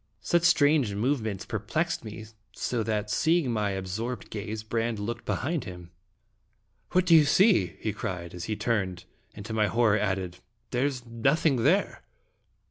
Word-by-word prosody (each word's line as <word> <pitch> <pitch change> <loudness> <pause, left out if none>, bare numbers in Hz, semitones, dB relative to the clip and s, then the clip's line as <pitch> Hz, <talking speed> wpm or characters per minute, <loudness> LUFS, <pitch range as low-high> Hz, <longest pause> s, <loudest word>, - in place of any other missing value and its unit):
Such 175 - +2
strange 145 -9 +3
move 125 +5 +1
ments 110 -1 -4
perplexed 120 - -2
me, 110 0 -8 0.3
so 120 -2 -2
that, 105 -1 -2
seeing 160 -5 +2
my 105 -3 0
ab 95 - -4
sorbed 110 +4 -4
gaze, 105 +1 -5
Brande 115 +1 -1
looked 115 +3 -5
behind 155 +1 -2
him. 90 -1 -9 1.0
"What 185 +1 +3
do 170 - +4
you 155 - +8
see?" 145 - +3
he 110 - -2
cried, 90 -5 -5
as 90 -1 -6
he 110 - -2
turned, 95 -6 -1 0.3
and 105 - -9
to 110 - -5
my 110 -1 +2
horror 110 0 +3
added, 95 -3 -2 0.2
" - - -45
there 125 +3 +1
is 130 -4 -5
nothing 135 +4 +1
here!" 165 - +2
110 Hz, 170 wpm, -27 LUFS, 100-135 Hz, 1.0 s, you